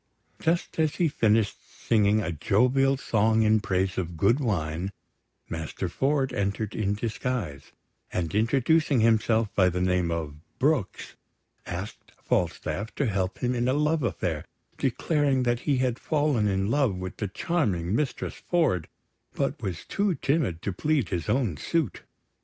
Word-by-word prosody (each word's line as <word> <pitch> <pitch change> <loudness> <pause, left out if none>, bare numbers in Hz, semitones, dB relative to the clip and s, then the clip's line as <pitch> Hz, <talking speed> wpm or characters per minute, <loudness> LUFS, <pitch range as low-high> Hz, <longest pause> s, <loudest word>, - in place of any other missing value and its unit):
Just 165 0 -1
as 155 -2 +2
he 175 - +2
finished 110 -6 +2
singing 105 -1 +1
a 85 - -2
jovial 125 - +2
song 110 -3 +2
in 110 0 +4
praise 95 -2 0
of 85 -2 -4
good 115 - +3
wine, 90 - -1 0.6
Master 80 +3 -4
Ford 135 +6 0
entered 100 +1 -2
in 100 -1 0
disguise; 110 - -3 0.4
and 85 -3 -2
introducing 135 +5 +3
himself 110 -1 +2
by 95 -2 +4
the 90 0 -2
name 90 -1 +1
of 80 -3 -3 0.2
Brooks, 135 -7 0 0.5
asked 90 +4 -7
Falstaff 85 +4 -1
to 145 - 0
help 95 -2 -2
him 125 0 +2
in 120 0 0
a 130 - +3
love 150 +2 +1
affair, 90 - -2 0.4
declaring 140 0 +1
that 120 -1 +1
he 140 - +3
had 125 -1 0
fallen 145 -8 +1
in 95 +1 0
love 135 -8 +2
with 90 -1 -6
the 105 - -2
charming 100 - -1
Mistress 145 +1 -2
Ford, 160 - 0 0.5
but - - -1
was 95 -3 -4
too 200 -3 0
timid 135 - 0
to 100 - -2
plead 145 - 0
his 85 -3 -3
own 120 - +1
suit. 160 - -1
110 Hz, 150 wpm, -27 LUFS, 95-135 Hz, 0.6 s, in